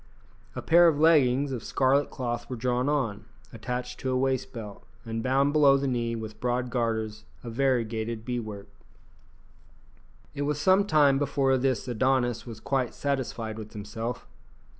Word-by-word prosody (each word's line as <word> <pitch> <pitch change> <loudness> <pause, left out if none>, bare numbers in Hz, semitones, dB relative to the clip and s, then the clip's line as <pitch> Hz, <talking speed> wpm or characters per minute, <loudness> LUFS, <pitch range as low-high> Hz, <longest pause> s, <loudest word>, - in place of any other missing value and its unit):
A - - -5
pair 170 +1 +6
of 150 -3 +2
leggings 140 -4 +4
of 125 -4 -4
scarlet 140 +2 +2
cloth 120 -2 -4
were 130 - -3
drawn 125 +3 0
on, 115 -8 -1 0.3
attached 125 +2 -5
to 130 - -3
a 130 - +1
waist 130 0 0
belt, 105 -4 -9 0.2
and 115 0 -3
bound 135 +4 +2
below 140 -3 +6
the 140 - -2
knee 120 -2 -1
with 110 -1 -7
broad 125 0 -1
garters 110 -3 -2 0.2
of 120 -2 -7
variegated 115 -3 -1
bead 125 -1 -2
work. 105 -2 -8 1.7
It 145 - -5
was 145 +1 -1
some 190 +5 +4
time 145 -4 +4
before 135 -2 +1
this 130 -2 0
Adonis 125 0 0
was 115 -2 -8
quite 130 0 -1
satisfied 120 -6 -3
with 110 0 -9
himself. 110 +3 -5
125 Hz, 160 wpm, -27 LUFS, 115-135 Hz, 1.7 s, pair